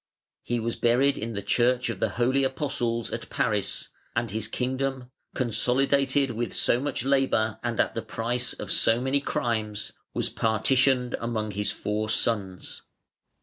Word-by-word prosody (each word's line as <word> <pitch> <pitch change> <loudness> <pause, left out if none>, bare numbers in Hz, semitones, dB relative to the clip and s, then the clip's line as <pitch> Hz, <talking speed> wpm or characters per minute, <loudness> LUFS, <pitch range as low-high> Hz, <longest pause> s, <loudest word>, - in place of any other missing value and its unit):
He 120 0 -1
was 115 +1 -2
buried 125 +4 +3
(511) 115 - -3
in 115 - -6
the 100 0 -5
Church 125 +2 +2
of 100 - -7
the - - +1
Holy 130 +3 +1
Apostles 130 -4 -1
at 115 - -5
Paris, 105 -3 -1 0.3
and 120 -2 0
his 110 0 -2
kingdom, 130 +1 -2 0.2
consolidated 135 +3 +2
with 120 +1 -3
so 120 - +3
much 135 -2 -2
labor 130 -6 +2
and 120 -2 -2
at - - +2
the 115 - -2
price 120 +3 -1
of - - -5
so 115 +1 +4
many 135 +2 +1
crimes, 110 -6 -2 0.2
was - - 0
partitioned 125 +3 +2
among 110 -2 -2
his 105 +1 -1
four 105 +1 -2
sons. 100 -5 0
120 Hz, 155 wpm, -27 LUFS, 110-130 Hz, 0.3 s, so